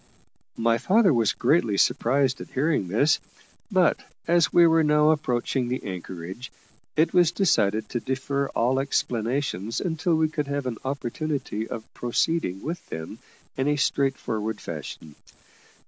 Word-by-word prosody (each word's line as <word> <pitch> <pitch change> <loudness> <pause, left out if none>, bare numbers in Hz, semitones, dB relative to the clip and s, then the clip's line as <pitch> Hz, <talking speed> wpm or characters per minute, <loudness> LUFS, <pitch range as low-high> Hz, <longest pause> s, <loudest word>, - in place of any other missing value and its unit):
My 115 0 +2
father 190 - +4
was 115 -3 +2
greatly 120 -6 +2
surprised 130 +3 +2
at - - -9
hearing 140 - 0
this, 125 - +2 0.5
but 185 -4 +3 0.3
as 170 -1 +3
we 175 - +6
were 165 -1 +4
now 150 0 +4
approaching 130 -4 -1
the 125 +1 -3
anchorage, 95 +4 -7 0.4
it 160 +2 +2
was 175 -2 +5
decided 110 - +1
to 120 - -2
defer 140 +2 -2
all 125 +3 +2
explanations 120 -5 -1
until 165 -1 0
we 160 0 +2
could 150 -2 -3
have 140 -1 -2
an 120 -4 -4
opportunity 135 -3 -3
of 110 - -6
proceeding 120 - -1
with 165 +4 -4
them 80 0 -7 0.4
in 135 +1 -1
a 150 - +2
straightforward 120 -7 -1
fashion. 75 -2 -8
135 Hz, 140 wpm, -25 LUFS, 115-155 Hz, 0.5 s, we